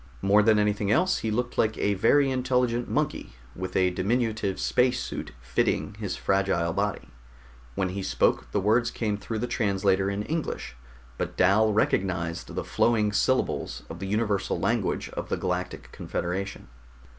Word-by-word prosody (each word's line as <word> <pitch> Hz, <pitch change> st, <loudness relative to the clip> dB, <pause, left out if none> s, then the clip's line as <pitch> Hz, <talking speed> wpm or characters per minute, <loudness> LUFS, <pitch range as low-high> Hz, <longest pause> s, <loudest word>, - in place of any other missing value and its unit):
More 100 Hz, +2 st, +5 dB
than 110 Hz, 0 st, +4 dB
anything 105 Hz, 0 st, +1 dB
else, 185 Hz, +11 st, +3 dB
he 110 Hz, -, -2 dB
looked 120 Hz, +3 st, -2 dB
like 110 Hz, -1 st, +2 dB
a 100 Hz, -, +1 dB
very 135 Hz, +8 st, +3 dB
intelligent 125 Hz, -2 st, 0 dB
monkey -, -, -2 dB, 0.2 s
with 95 Hz, 0 st, -5 dB
a 90 Hz, -1 st, +3 dB
diminutive 105 Hz, +1 st, -1 dB
space 125 Hz, 0 st, +2 dB
suit -, -, -5 dB
fitting 60 Hz, -, 0 dB
his 100 Hz, -4 st, -3 dB
fragile 95 Hz, -4 st, +1 dB
body. -, -, -2 dB, 0.7 s
When 95 Hz, -1 st, 0 dB
he 95 Hz, +2 st, -4 dB
spoke -, -, +1 dB
the -, -, +1 dB
words 115 Hz, +4 st, +2 dB
came 110 Hz, -4 st, -2 dB
through 105 Hz, +2 st, -5 dB
the 115 Hz, -, -1 dB
translator 100 Hz, -5 st, +1 dB
in 100 Hz, +1 st, -2 dB
English; 160 Hz, -, -4 dB, 0.4 s
but -, -, -3 dB
Dal 105 Hz, +4 st, +4 dB
recognized 90 Hz, -5 st, 0 dB
the -, -, -2 dB
flowing 110 Hz, -3 st, +2 dB
syllables 105 Hz, -, 0 dB
of 85 Hz, -, -8 dB
the 95 Hz, -, -4 dB
universal 105 Hz, -1 st, 0 dB
language -, -, 0 dB
of -, -, -6 dB
the -, -, 0 dB
Galactic -, -, -3 dB
Confederation. 95 Hz, +3 st, -4 dB
105 Hz, 155 wpm, -27 LUFS, 95-115 Hz, 0.7 s, More